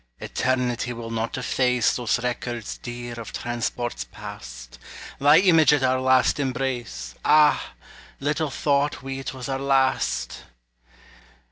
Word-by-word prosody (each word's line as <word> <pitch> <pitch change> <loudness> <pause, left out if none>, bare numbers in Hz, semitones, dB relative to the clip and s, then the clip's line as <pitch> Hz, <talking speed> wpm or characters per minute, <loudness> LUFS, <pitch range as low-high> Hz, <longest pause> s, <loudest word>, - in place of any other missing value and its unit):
Eternity 125 -1 -1
will 115 -1 -7
not 115 +2 -2
efface 125 -1 +1
Those 120 -1 0
records 120 -2 -4
dear 120 -1 -7
of 115 - -8
transports 120 - -3
past; - - -10 0.4
Thy 145 +3 +6
image 165 -5 +5
at 145 -2 +2
our 130 0 +2
last 130 +2 +3
embrace; 125 - -3
Ah! 150 0 +4 0.5
little 150 +2 -1
thought 140 0 0
we 135 0 -5
't 135 - -6
was 125 - -6
our 135 -1 -2
last! 135 - +1
125 Hz, 125 wpm, -24 LUFS, 120-135 Hz, 0.5 s, Thy